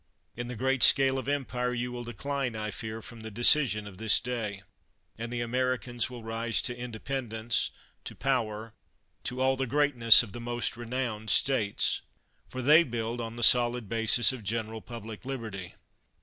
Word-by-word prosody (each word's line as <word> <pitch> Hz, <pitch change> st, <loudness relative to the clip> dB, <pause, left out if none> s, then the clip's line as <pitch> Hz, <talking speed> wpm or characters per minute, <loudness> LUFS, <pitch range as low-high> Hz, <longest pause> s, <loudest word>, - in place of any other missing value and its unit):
In 120 Hz, 0 st, -5 dB
the 125 Hz, -, -6 dB
great 130 Hz, +2 st, 0 dB
scale 135 Hz, +1 st, +6 dB
of 130 Hz, -, -7 dB
empire, 125 Hz, -3 st, -2 dB
you 125 Hz, +1 st, -3 dB
will 120 Hz, 0 st, -6 dB
decline, 125 Hz, +2 st, -4 dB
I 105 Hz, 0 st, -3 dB
fear, 110 Hz, +3 st, -6 dB
from 120 Hz, -, -10 dB
the 110 Hz, 0 st, -8 dB
decision 115 Hz, -1 st, +4 dB
of 95 Hz, -3 st, -11 dB
this 110 Hz, -2 st, +3 dB
day; 110 Hz, -5 st, -5 dB, 0.5 s
and 115 Hz, +1 st, -6 dB
the 120 Hz, -1 st, -3 dB
Americans 125 Hz, 0 st, -1 dB
will 120 Hz, -2 st, -9 dB
rise 115 Hz, 0 st, 0 dB
to 125 Hz, -, 0 dB
independence, 120 Hz, -1 st, -3 dB, 0.4 s
to -, -, -7 dB
power, 115 Hz, -4 st, -2 dB, 0.5 s
to 130 Hz, 0 st, -3 dB
all 130 Hz, 0 st, +3 dB
the 135 Hz, 0 st, -2 dB
greatness 125 Hz, -5 st, +5 dB
of 110 Hz, -, -10 dB
the 120 Hz, -, -7 dB
most 120 Hz, 0 st, -1 dB
renowned 120 Hz, -2 st, -4 dB
states! 120 Hz, -8 st, +2 dB, 0.5 s
For 130 Hz, 0 st, -5 dB
they 155 Hz, +6 st, +7 dB
build 120 Hz, -2 st, -4 dB
on 115 Hz, 0 st, -6 dB
the 120 Hz, -, -4 dB
solid 120 Hz, -1 st, +5 dB
basis 115 Hz, +3 st, +3 dB
of 130 Hz, -, -8 dB
general 110 Hz, +1 st, -3 dB
public 115 Hz, -2 st, -9 dB
liberty. 110 Hz, -9 st, -7 dB
120 Hz, 170 wpm, -28 LUFS, 110-130 Hz, 0.5 s, they